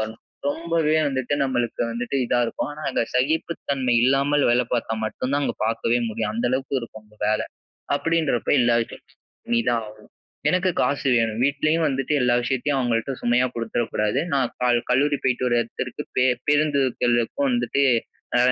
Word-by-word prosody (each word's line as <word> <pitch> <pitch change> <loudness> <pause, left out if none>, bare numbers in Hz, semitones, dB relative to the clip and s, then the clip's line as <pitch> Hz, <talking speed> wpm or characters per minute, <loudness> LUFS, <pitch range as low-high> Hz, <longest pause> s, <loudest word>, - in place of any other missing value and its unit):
வரணும். 110 0 -5 0.3
ரொம்பவே 165 0 0
வந்துட்டு 130 +1 -1
நம்மளுக்கு 120 -3 -2
வந்துட்டு 125 +3 -3
இதா 120 - +1
இருக்கும். - - -3
ஆனா 155 +1 -9
அங்க - - 0
சகிப்பு 155 +6 +1 0.2
தன்மை 130 -3 +1
இல்லாமல் 140 +3 +3
வேலை 120 +1 +3
பார்த்தா 115 -1 -1
மட்டும் 125 +5 -4
தான் 145 - +2
அங்க - - -1
பார்க்கவே 115 +1 +1
முடியும். 110 -1 -2
அந்த 115 - -2
அளவுக்கு 135 +1 -1
இருக்கும் 110 -2 -10
அங்க 105 0 -24
வேலை. 110 0 +1 0.5
அப்படின்றப்ப 155 -5 0
எல்லா 120 -1 +3
விஷயத்தையும் 135 - -15
பண்ணிதாகணும். 115 - -2 0.4
எனக்கு 185 0 +2
காசு 140 0 0
வேணும். 115 -1 0
வீட்லயும் 155 +3 +1
வந்துட்டு 135 +1 -2
எல்லா 125 -1 +3
விஷயத்தையும் 135 +3 0
அவங்கள்ட்ட 120 +2 0
சுமையா 120 +1 +3
குடுத்துறக் 115 0 -2
கூடாது. 105 +4 0
நான் 130 -3 +1
கால் 120 -1 +4
கல்லூரி 145 +3 +3
போய்ட்டு 125 0 +1
வரத்திற்கு 120 +3 -2 0.2
பே 125 - +4 0.2
பேருந்துக்களுக்கும் 140 - +1
வந்துட்டு 240 - 0 0.5
அ - - +4
130 Hz, 155 wpm, -23 LUFS, 120-145 Hz, 0.5 s, கால்